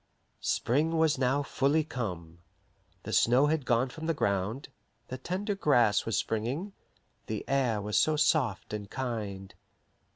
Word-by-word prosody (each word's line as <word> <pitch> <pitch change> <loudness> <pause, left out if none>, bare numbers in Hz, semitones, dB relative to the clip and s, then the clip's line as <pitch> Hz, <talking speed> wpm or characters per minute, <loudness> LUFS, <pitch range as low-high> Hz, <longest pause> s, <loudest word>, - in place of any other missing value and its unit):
Spring 155 +7 +1
was 160 -4 +2
now 135 +2 +2
fully 145 +3 +1
come. 90 - -5 0.6
The - - -5
snow 125 +4 +4
had 150 -3 0
gone 120 +2 +2
from 160 +5 -7
the 165 - +1
ground, 100 +5 -1 0.4
the 130 - -5
tender 190 - -2
grass 120 - +3
was 115 - 0
springing, 130 - -2 0.5
the 110 -1 -4
air 130 -6 +1
was 105 +1 0
so 155 - +3
soft 140 -10 +1
and 105 -2 -5
kind. 105 -7 -4
130 Hz, 140 wpm, -29 LUFS, 105-150 Hz, 0.6 s, snow